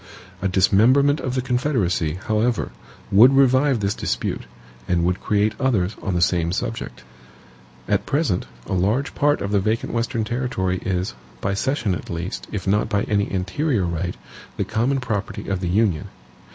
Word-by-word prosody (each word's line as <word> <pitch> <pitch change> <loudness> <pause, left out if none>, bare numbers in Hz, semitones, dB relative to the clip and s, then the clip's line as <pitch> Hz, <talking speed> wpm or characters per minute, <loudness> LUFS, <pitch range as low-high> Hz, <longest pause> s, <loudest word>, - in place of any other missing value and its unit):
A 95 - +1
dismemberment 120 - +4
of 130 0 -3
the 130 - 0
Confederacy, 120 - 0
however, 110 0 0 0.4
would 125 +7 +7
revive 135 -2 +4
this 100 0 +1
dispute, - - -3 0.4
and 85 -1 +1
would 90 +1 0
create 105 +1 +1
others 110 -8 +1
on 95 -3 -2
the 85 - +3
same 85 -1 +1
subject. 95 - -4 0.8
At - - 0
present, 140 - 0 0.2
a - - -4
large 105 +10 +1
part 145 +1 +2
of 100 - -2
the 100 - +3
vacant 110 +4 -1
Western 115 -1 -1
territory 110 -6 -1
is, 90 -3 -1 0.3
by 100 - -1
cession 120 -1 0
at 90 - -6
least, 85 +3 -4
if 100 - -4
not 105 +3 +1
by 100 -3 +1
any 100 -1 0
anterior 100 - 0
right, 85 +1 -3 0.4
the - - 0
common 125 +5 0
property 105 -6 -3
of 95 -2 -1
the 90 -2 -2
Union. 95 -4 +1
105 Hz, 165 wpm, -22 LUFS, 95-125 Hz, 0.8 s, would